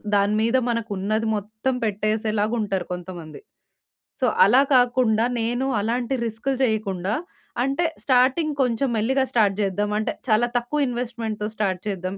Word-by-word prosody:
దాని 200 Hz, +1 st, +3 dB
మీద 230 Hz, +3 st, +2 dB
మనకున్నది 215 Hz, -1 st, -1 dB
మొత్తం 220 Hz, +5 st, -3 dB
పెట్టేసేలాగుంటరు 215 Hz, -1 st, -1 dB
కొంతమంది. 175 Hz, -3 st, -8 dB, 0.8 s
సో, -, -, +3 dB, 0.2 s
అలా 245 Hz, +7 st, +5 dB
కాకుండా 245 Hz, -3 st, +3 dB, 0.2 s
నేను 245 Hz, +3 st, -1 dB, 0.2 s
అలాంటి 240 Hz, +4 st, -1 dB
రిస్కులు 230 Hz, +4 st, -2 dB
చెయకుండా, 205 Hz, -4 st, -1 dB, 0.5 s
అంటే, 275 Hz, +6 st, 0 dB, 0.2 s
స్టార్టింగ్ 265 Hz, +4 st, +3 dB
కొంచెం 250 Hz, +2 st, 0 dB
మెల్లిగా 265 Hz, +5 st, +1 dB
స్టార్ట్ 210 Hz, -4 st, +3 dB
చేద్దాం. 200 Hz, +1 st, -1 dB
అంటే, 215 Hz, -, -1 dB, 0.2 s
చాలా 220 Hz, +3 st, +4 dB
తక్కువ 270 Hz, +5 st, -3 dB
ఇన్వెస్ట్‌మెంట్‌తో 230 Hz, -3 st, -3 dB
స్టార్ట్ 190 Hz, -4 st, -1 dB
చేద్దాం. 190 Hz, 0 st, -4 dB
220 Hz, 125 wpm, -23 LUFS, 205-245 Hz, 0.8 s, అలా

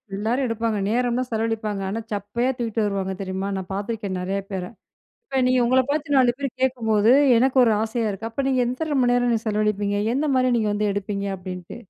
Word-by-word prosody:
எல்லாரும் 230 Hz, +7 st, 0 dB
எடுப்பாங்க. 230 Hz, -1 st, -1 dB
நேரம் 245 Hz, +1 st, +1 dB
தான் 255 Hz, -1 st, -3 dB
செலவழிப்பாங்க. 220 Hz, -2 st, -2 dB
ஆனா 220 Hz, -, -3 dB
சப்பையா 210 Hz, +5 st, -1 dB
தூக்கிட்டு 225 Hz, -2 st, -1 dB
வருவாங்க. 195 Hz, -2 st, -2 dB
தெரியுமா? 190 Hz, 0 st, -3 dB
நான் 190 Hz, 0 st, -6 dB
பார்த்துருக்கேன் 200 Hz, -2 st, -3 dB
நிறைய 195 Hz, +2 st, -2 dB
பேர. 190 Hz, -2 st, -3 dB, 0.6 s
இப்ப 265 Hz, -10 st, 0 dB
நீங்க 255 Hz, 0 st, +3 dB
உங்கள 260 Hz, +2 st, +4 dB
பார்த்து 290 Hz, -1 st, -1 dB
4 250 Hz, -2 st, +5 dB
பேர் 280 Hz, -1 st, -2 dB
கேக்கும்போது 225 Hz, -4 st, +2 dB, 0.3 s
எனக்கு 260 Hz, +3 st, +2 dB
ஒரு 225 Hz, -, +3 dB
ஆசையா 225 Hz, 0 st, -1 dB
இருக்கு. 205 Hz, +3 st, -5 dB
அப்ப 270 Hz, +4 st, -2 dB
நீங்க 260 Hz, -1 st, +2 dB
எத்தன 285 Hz, +4 st, -1 dB
மணி 245 Hz, 0 st, +3 dB
நேரம் 245 Hz, 0 st, +2 dB
நீங்க 225 Hz, -1 st, -1 dB
செலவழிப்பீங்க? 210 Hz, -1 st, 0 dB, 0.2 s
எந்த 295 Hz, +3 st, 0 dB
மாரி 255 Hz, 0 st, +3 dB
நீங்க 215 Hz, -2 st, 0 dB
வந்து 210 Hz, 0 st, 0 dB
எடுப்பீங்க? 200 Hz, 0 st, -3 dB
அப்படின்ட்டு. 180 Hz, -1 st, -8 dB
225 Hz, 190 wpm, -23 LUFS, 205-250 Hz, 0.6 s, 4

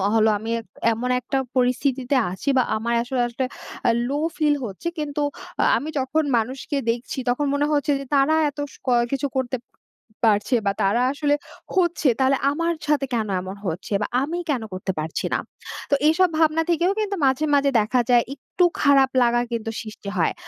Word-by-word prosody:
হলো, 220 Hz, 0 st, +4 dB
আমি 225 Hz, +1 st, -6 dB
এক 225 Hz, -, -11 dB, 0.3 s
এমন 245 Hz, +3 st, -3 dB
একটা 250 Hz, +2 st, -2 dB, 0.2 s
পরিস্থিতি 255 Hz, +1 st, +1 dB, 0.3 s
আছি 190 Hz, +9 st, -3 dB
বা 255 Hz, -, +5 dB
আমার 235 Hz, +2 st, -2 dB
আসলে, 245 Hz, 0 st, -1 dB
আসলে 240 Hz, +2 st, -2 dB, 0.4 s
আ -, -, +6 dB, 0.2 s
লো 285 Hz, +2 st, -1 dB, 0.2 s
ফিল 300 Hz, -2 st, +3 dB
হচ্ছে, 200 Hz, -, -6 dB
কিন্তু 295 Hz, 0 st, -2 dB, 0.6 s
আমি 305 Hz, -, -4 dB
যখন 280 Hz, +4 st, 0 dB
মানুষকে 260 Hz, +5 st, -2 dB
দেখছি 235 Hz, +3 st, -2 dB
তখন 285 Hz, +4 st, +1 dB
মনে 290 Hz, +1 st, +1 dB
হচ্ছে 290 Hz, 0 st, +1 dB
যে, 275 Hz, -, -7 dB
"তারা 275 Hz, +3 st, +4 dB, 0.2 s
এত 285 Hz, -, -15 dB, 0.2 s
স -, -, -14 dB, 0.4 s
কিছু 275 Hz, +1 st, 0 dB
করতে 255 Hz, 0 st, -1 dB, 0.7 s
পারছে 210 Hz, +4 st, +2 dB
বা -, -, +4 dB
তারা 215 Hz, +5 st, +2 dB
আসলে 290 Hz, 0 st, +1 dB, 0.4 s
হচ্ছে, 345 Hz, -5 st, +2 dB
তাহলে 265 Hz, 0 st, +3 dB
আমার 335 Hz, +3 st, 0 dB, 0.2 s
সাথে 290 Hz, -2 st, +2 dB
কেন 220 Hz, -2 st, 0 dB
এমন 190 Hz, +1 st, -7 dB
হচ্ছে, 180 Hz, +5 st, -4 dB
বা -, -, 0 dB
আমি 320 Hz, +5 st, -2 dB
কেন 265 Hz, -5 st, +1 dB
করতে 185 Hz, +1 st, -3 dB
পারছি 155 Hz, +1 st, -3 dB
না?" -, -, +3 dB, 0.5 s
তো 280 Hz, -, +6 dB
এইসব 355 Hz, +3 st, +4 dB
ভাবনা 320 Hz, 0 st, +3 dB
থেকেও 345 Hz, +3 st, +2 dB
কিন্তু 405 Hz, -2 st, -1 dB
মাঝে, 265 Hz, +3 st, +2 dB
মাঝে 280 Hz, 0 st, +3 dB
দেখা 220 Hz, +4 st, +1 dB
যায়, 240 Hz, -1 st, +5 dB
একটু 350 Hz, +6 st, -2 dB, 0.2 s
খারাপ 275 Hz, -2 st, +5 dB
লাগা 240 Hz, 0 st, +3 dB
কিন্তু 225 Hz, -1 st, -3 dB
সৃষ্টি 215 Hz, -2 st, -8 dB
হয়। 165 Hz, -, +2 dB
265 Hz, 180 wpm, -23 LUFS, 235-295 Hz, 0.7 s, আ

